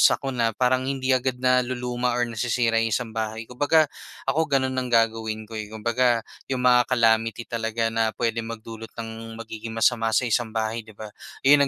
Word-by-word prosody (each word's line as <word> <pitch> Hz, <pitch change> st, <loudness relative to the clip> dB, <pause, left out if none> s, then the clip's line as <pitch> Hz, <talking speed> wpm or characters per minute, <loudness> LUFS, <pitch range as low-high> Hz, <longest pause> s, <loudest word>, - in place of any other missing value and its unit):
sakuna, 120 Hz, -5 st, -1 dB
parang 130 Hz, +1 st, +2 dB
hindi 135 Hz, -1 st, 0 dB
agad 130 Hz, 0 st, +1 dB
naluluma 125 Hz, -1 st, +1 dB
or 120 Hz, -, +2 dB
nasisira 115 Hz, 0 st, +1 dB
yung 115 Hz, -, +1 dB
isang 120 Hz, -3 st, -3 dB
bahay. 110 Hz, 0 st, -3 dB
Kumbaga, 145 Hz, +7 st, +3 dB, 0.4 s
ako 160 Hz, +1 st, +1 dB
gano'n 135 Hz, -2 st, +1 dB
ang 125 Hz, -, -3 dB
gagawin 115 Hz, -2 st, +1 dB
ko 110 Hz, 0 st, -7 dB
eh. 105 Hz, -, -5 dB
Kumbaga, 115 Hz, +2 st, +1 dB, 0.2 s
yung 130 Hz, -1 st, -2 dB
mga 125 Hz, -1 st, +5 dB
calamity 115 Hz, -2 st, +2 dB
talaga 115 Hz, -1 st, -2 dB
na 110 Hz, -1 st, 0 dB
puwedeng 115 Hz, -1 st, -1 dB
magdulot 115 Hz, 0 st, -8 dB
ng 115 Hz, 0 st, -7 dB
magiging 110 Hz, 0 st, -7 dB
masama 115 Hz, 0 st, +2 dB
sa 130 Hz, -, +3 dB
isang 115 Hz, -1 st, 0 dB
bahay, 110 Hz, +1 st, -1 dB
'di 110 Hz, -, -14 dB
ba. 105 Hz, 0 st, -8 dB, 0.3 s
Yun 140 Hz, +1 st, +6 dB
115 Hz, 175 wpm, -25 LUFS, 115-125 Hz, 0.4 s, Yun